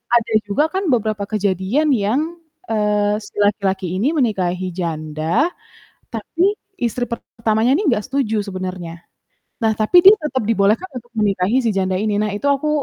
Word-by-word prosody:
ada 230 -1 +1 0.2
juga 205 +9 +2
kan 380 -1 -1
beberapa 215 -3 0
kejadian 205 - 0
yang, 220 +5 +1 0.5
eee, 210 -1 +1
si - - -14
laki-laki 195 -2 0
ini 235 +9 +2
menikahi 185 -7 0
janda, 160 - -1 0.6
tapi 330 - 0 0.3
istri 245 0 -1
pertamanya 225 0 0
ini 400 +4 -1
enggak 220 -6 +1
setuju 245 -6 0
sebenarnya. 185 -3 -6 0.6
Nah, 220 - +4
tapi 220 +11 +5
dia 390 - +12
tetap 275 -6 -2
dibolehkan 220 - +2
untuk 240 0 -11
menikahi 205 +3 +2
si 230 - +2
janda 190 -1 0
ini. 210 0 0
Nah, 215 -1 -1
itu 210 - -2
aku 280 +2 0
215 Hz, 150 wpm, -19 LUFS, 190-245 Hz, 0.6 s, dia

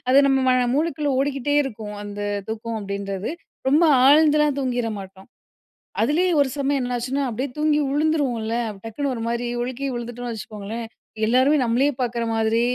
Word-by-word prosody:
அது 265 +2 +6
நம்ம 270 -1 +3
மன 255 0 +4 0.2
மூளைக்குள்ள 300 -1 0
ஓடிக்கிட்டே 280 0 0
இருக்கும். 220 -5 -6
அந்த 205 0 -7 0.3
தூக்கம் 225 +1 -4
அப்டின்றது. 200 +1 -4 0.4
ரொம்ப 300 +5 +4 0.2
ஆழ்ந்துலாம் 300 -1 +5
தூங்கிற 245 -3 -1
மாட்டோம். 190 0 -11 0.7
அதுலயே 355 +5 +2
ஒரு 280 - +3
சமயம் 280 0 +1
என்னாச்சுன்னா, 250 +3 -2
அப்டியே 250 +4 -3
தூங்கி 300 0 +2
உழுந்துருவோம்ல. 280 -7 0 0.2
அப்ப 195 -2 -11
டக்குனு 270 +6 -2
ஒருமாரி 235 +1 -2
ஒழுக்கி 255 +2 -4
விழுந்துட்டோன்னு 240 0 -5
வச்சுக்கோங்களேன்! 215 +1 -6 0.4
எல்லாருமே 260 +6 +4
நம்மளயே 250 +5 +2
பாக்குற 235 -1 -1
மாதிரி, 225 +1 +2
245 Hz, 140 wpm, -23 LUFS, 225-285 Hz, 0.7 s, அது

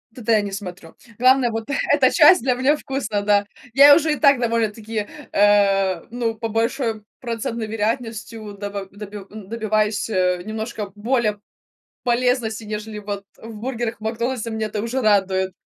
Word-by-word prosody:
туда 230 -2 0
я 215 - +4
не 200 -1 -5
смотрю. 185 -4 -8 0.2
Главное- 255 -1 +4
вот 225 0 -4 0.3
эта 265 -3 +4
часть 335 +5 +7
для 255 +1 +2
меня 260 +4 +2
вкусно, 265 -8 -3
да. 205 0 +2 0.3
Я 285 +2 +9
уже 315 -1 +2
и - - -1
так 280 -3 +5
довольно-таки, 225 -2 -1 0.3
э, 195 -3 +3
ну, 235 -1 -2
по 225 +1 -4
большой 225 0 -1 0.2
процентной 230 -1 -4
вероятностью, 225 -1 -3
доба 200 -1 -6
доби 210 0 -9
н 210 -2 -11
добиваюсь, 215 -1 0
э, 180 -3 +1
немножко 220 -1 -5
более 215 -1 0 0.6
полезности, 240 -2 0
нежели 215 0 -5
вот 200 -1 -5
в 225 0 -10
бургерах 235 -1 -4
"Макдональдса", 235 +2 -2
меня 220 -1 -2
это 210 -1 -4
уже 235 +4 -2
радует. 195 -4 +2
220 Hz, 155 wpm, -21 LUFS, 205-240 Hz, 0.6 s, Я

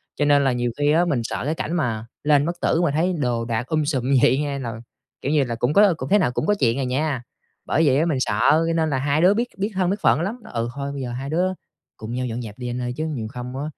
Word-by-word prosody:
cho 145 - 0
nên 145 -1 +4
là 135 - +3
nhiều 120 -1 -1
khi 145 0 +3
á 170 +3 +3
mình 140 -8 0
sợ 120 - -4
cái 155 +2 -1
cảnh 165 - -3
mà 115 -9 -1 0.2
lên 145 -1 +4
bất 175 +1 -3
tử 165 - +2
mà 170 - +2
thấy 165 +5 +1
đồ 120 -4 0
đạc 115 +1 -2
um 155 -1 +1
sùm 140 -5 -1
như 135 - +5
vậy 130 +3 +4
nha 145 -2 -2
nà, 120 -3 -4 0.5
kiểu 140 - -1
như 150 -3 +3
là, 120 -2 -3
cũng 120 +5 0
có 200 -3 +6
cũng - - -5
thế 205 - +5
nào 125 - +1
cũng 155 - -2
có 210 - +3
chuyện 120 +2 +2
à - - 0
nha. 130 0 -1 0.4
Bởi 165 - +2
vậy 130 - +4
á, 165 - +2
mình 155 -6 0
sợ, 105 -4 0 0.3
cho 165 - +1
nên 160 -1 +1
là 135 - 0
hai 140 +4 +1
đứa 185 +3 +6
biết 235 +3 0
biết 200 +2 -1
thân 185 -1 +1
biết 205 +2 -1
phận - - +3
lắm, 215 +8 -3
nói: - - -13
"Ừ, 115 0 -1
thôi 140 0 -4
bây 140 - -5
giờ 125 -2 -4
hai 135 +3 -5
đứa 170 +4 +1 0.5
cùng 110 +2 -7
nhau 125 +1 -2
dọn 120 0 -4
dẹp 110 -2 -8
đi 125 - -4
anh 125 +1 -3
ơi, 125 0 -3
chứ 155 - -2
nhiều 130 -9 -4
không 125 +2 -7
á 140 - -3
140 Hz, 310 wpm, -22 LUFS, 125-160 Hz, 0.5 s, có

